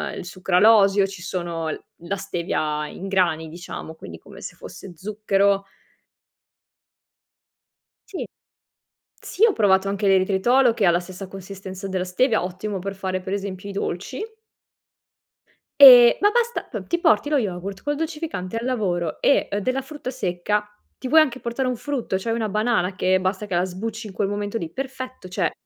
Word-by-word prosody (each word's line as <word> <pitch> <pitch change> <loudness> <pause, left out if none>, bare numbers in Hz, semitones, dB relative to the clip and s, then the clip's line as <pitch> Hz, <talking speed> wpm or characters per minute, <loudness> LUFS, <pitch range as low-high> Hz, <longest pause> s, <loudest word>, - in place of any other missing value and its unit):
il - - -7
sucralosio, 195 +2 +4
ci 195 -3 -10
sono 170 -3 -3
l - - -4 0.3
la 200 +2 -2
stevia 155 -5 -2
in 195 +5 -8
grani 175 -4 +1
diciamo, 160 -1 -8
quindi 85 - -10
come - - -14
se - - -8
fosse 190 - -10
zucchero 200 +1 +1 2.5
Sì. 385 - -5 1.0
Sì, 430 - +1
ho 435 - +3
provato 195 - +3
anche 200 0 0
l'eritritolo 205 +6 +3
che 210 - 0
ha 175 - +6
la 170 - +3
stessa 185 +1 -9
consistenza 190 0 -8
della 185 -1 -2
stevia, 220 +4 +1
ottimo 185 +2 -4
per 195 +1 -5
fare 185 -1 -3
per 185 +1 -6
esempio 200 -1 -4
i - - -5
dolci. 195 +5 -4 1.6
Ehm, 245 -3 +10
ma 410 +1 +5
basta, 475 +1 0
p - - -7
ti 345 - 0
porti 320 -3 +3
lo 300 - +2
yogurt 195 -3 -3
col 290 0 -1
dolcificante 305 - -4
al 230 - -3
lavoro 180 -10 -1
e 280 - +3
della 255 +5 -1
frutta 280 -2 -7
secca, 210 -2 -1 0.3
ti 260 - -7
puoi 315 +3 +7
anche 265 -4 +1
portare 245 +2 -2
un 250 - -1
frutto, 245 -8 -3
cioè 225 +4 -3
una 225 -2 -1
banana 210 -3 0
che 185 0 +2
basta 190 +2 -2
che 185 - -4
la 180 - +2
sbucci 220 +5 -5
in 195 - -10
quel 195 - 0
momento 205 +1 -3
lì. 165 -1 -5
Perfetto, 260 -6 -6
cioè 185 -3 -1
200 Hz, 165 wpm, -23 LUFS, 185-240 Hz, 2.5 s, Ehm